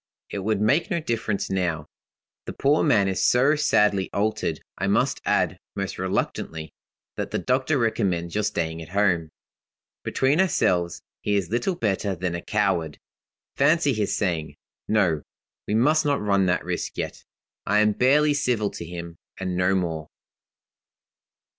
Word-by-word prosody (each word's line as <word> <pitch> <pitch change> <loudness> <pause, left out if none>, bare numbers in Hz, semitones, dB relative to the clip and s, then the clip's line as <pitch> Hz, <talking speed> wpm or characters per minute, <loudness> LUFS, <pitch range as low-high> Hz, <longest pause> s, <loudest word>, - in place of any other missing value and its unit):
It 100 - -3
would 105 +1 0
make 140 - +2
no 170 -4 0
difference 115 -10 -2
now; 85 -5 -1 0.6
the - - -4
poor 145 +3 +2
man 105 -10 +3
is 95 -1 0
so 135 +5 +4
sadly 105 -10 +2
altered. 105 -6 -1 0.2
I - - -2
must - - +1
add, - - +1 0.2
most 100 -2 -4
reluctantly, 80 -4 -3 0.4
that - - -3
the - - -2
doctor 130 +4 +1
recommends 100 -8 0
your 105 - 0
staying 85 -6 -2
at 80 - -10
home. 90 -4 +1 0.7
Between 140 +6 +2
ourselves, 85 - +1 0.2
he 105 - 0
is 95 -3 -1
little 120 +11 0
better 100 - -1
than 90 0 -3
a 85 - -3
coward. 95 -7 0 0.6
Fancy 145 0 +3
his 105 -3 -1
saying; 80 -7 -2 0.3
'No; 90 -8 +2 0.5
we 105 - 0
must 150 +7 +4
not 145 -2 +1
run 100 -2 +2
that 90 0 0
risk - - -3
yet.' - - -4 0.4
I 105 - +3
am 105 0 +4
barely 145 +7 +3
civil 125 -8 0
to - - -7
him, 85 0 -8 0.2
and 95 -1 -2
no 90 +2 +2
more. 80 -4 -2
100 Hz, 155 wpm, -24 LUFS, 90-125 Hz, 0.7 s, so